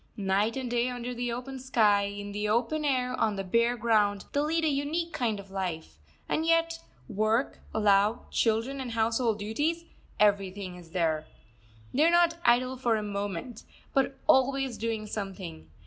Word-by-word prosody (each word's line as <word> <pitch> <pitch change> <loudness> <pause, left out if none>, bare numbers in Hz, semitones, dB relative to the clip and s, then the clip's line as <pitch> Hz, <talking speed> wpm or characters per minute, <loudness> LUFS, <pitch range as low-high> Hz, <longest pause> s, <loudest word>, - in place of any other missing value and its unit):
Night 205 +4 +1
and 260 -1 -3
day 240 +1 +1
under 245 0 -4
the 245 0 -2
open 255 +3 -5
sky, 215 -6 +3
in 205 0 -6
the 210 +1 -2
open 240 +8 +1
air, 255 -3 +1
on 215 -2 +1
the 195 - -3
bare 235 +5 +2
ground, 210 -3 +2
they 285 - +1
lead 320 +2 +1
a - - +3
unique 305 +4 -1
kind 235 -8 -1
of 200 -1 -12
life; 165 - -4 0.3
and 315 - 0
yet 330 0 +2 0.3
work, 220 +4 0
love, 210 +1 +2
children, 230 +5 +1
and 245 -3 -5
household 225 0 +1
duties 295 +11 -1 0.3
everything 195 -2 +1
is 175 -2 -13
there. 160 -3 0 0.7
They 290 - +3
are 330 - +6
not 340 -1 +3
idle 255 -1 +3
for 240 -3 +1
a 215 - -2
moment, 205 +2 -4 0.3
but 270 0 +1
always 265 -1 +3
doing 225 -1 -2
something. 190 - -6
230 Hz, 165 wpm, -28 LUFS, 205-265 Hz, 0.7 s, are